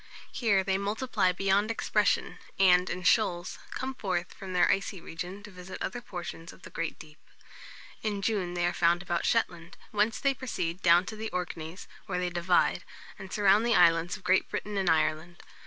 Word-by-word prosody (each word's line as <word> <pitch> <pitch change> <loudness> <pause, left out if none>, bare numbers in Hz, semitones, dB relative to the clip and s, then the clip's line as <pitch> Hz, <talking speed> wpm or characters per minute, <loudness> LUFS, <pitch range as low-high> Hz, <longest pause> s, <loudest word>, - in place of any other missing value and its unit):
Here 205 -6 +2
they 190 0 0
multiply 205 -1 0
beyond 195 +3 +1
expression, 230 - 0 0.2
and, 180 -1 +5
in 185 - -4
shoals, 180 -4 +1
come 265 0 -4
forth 185 -8 -3
from 190 -1 -9
their 180 -1 +4
icy 195 -1 -1
region 180 +5 -7
to 210 - -11
visit 180 0 -9
other 240 +6 -4
portions 175 -5 -7
of - - -18
the - - -11
great 165 -1 -3
deep. 155 0 -14 0.8
In 205 -2 -2
June 190 -5 -1
they 175 0 +1
are 175 - +1
found 175 +1 +2
about 175 -2 -1
Shetland, 175 -7 -1
whence 215 +1 +1
they 275 -1 +2
proceed 185 -9 -4
down 175 +1 +5
to 220 - -6
the 220 +1 -5
Orkneys, 175 -1 -5 0.2
where 185 -3 -2
they 180 0 -1
divide, 175 +1 +2 0.4
and 190 -2 -9
surround 205 +1 +4
the 235 0 +2
islands 170 0 +4
of 185 - -19
Great 185 +1 +2
Britain 210 0 -4
and 190 -3 +1
Ireland. 160 +2 0
185 Hz, 185 wpm, -29 LUFS, 175-205 Hz, 0.8 s, and